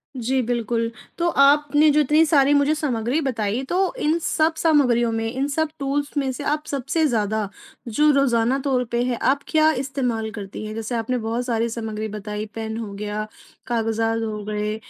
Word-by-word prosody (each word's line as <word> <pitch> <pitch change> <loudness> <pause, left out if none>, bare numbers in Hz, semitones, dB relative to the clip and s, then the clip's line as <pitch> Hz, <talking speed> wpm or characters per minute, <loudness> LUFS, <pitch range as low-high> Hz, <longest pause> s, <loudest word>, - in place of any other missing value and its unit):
जी 255 +2 0
बिल्कुल। 230 -1 -1 0.3
तो 345 0 +1
आपने 290 +1 +4
जो 300 - +3
इतनी 300 +3 +4
सारी 290 -3 +4
मुझे 285 +1 +3
सामग्री 255 -2 -1
बताई 225 -4 -1
तो 380 +5 +1
इन 310 -1 +2
सब 320 0 +1
सामग्रियों 250 -7 +3
में, 225 0 -2
इन 265 +2 -1
सब 315 +2 0
टूल्स 285 +2 -2
में 270 -2 +1
से 270 +3 -6
आप 300 +1 -1
सबसे 280 +4 0
ज़्यादा 215 -4 -1 0.4
जो 300 +7 +3
रोज़ाना 265 -2 +2
तौर 260 -2 0
पे 240 +1 +1
है 245 -1 -1
आप 280 +1 +2
क्या 315 -1 +4
इस्तेमाल 255 -5 -2
करती 205 0 -7
हैं? 215 - -5
जैसे 225 +2 -4
आपने 235 +2 -1
बहुत 230 +1 -2
सारी 235 -1 0
सामग्री 220 -2 -4
बताई 210 0 -5
पेन 220 0 -4
हो, 215 -3 -5
गया 210 +1 -4 0.4
कागज़ात 225 -1 0
हो 215 -2 -4
गए 210 0 -2
245 Hz, 180 wpm, -22 LUFS, 225-285 Hz, 0.4 s, आपने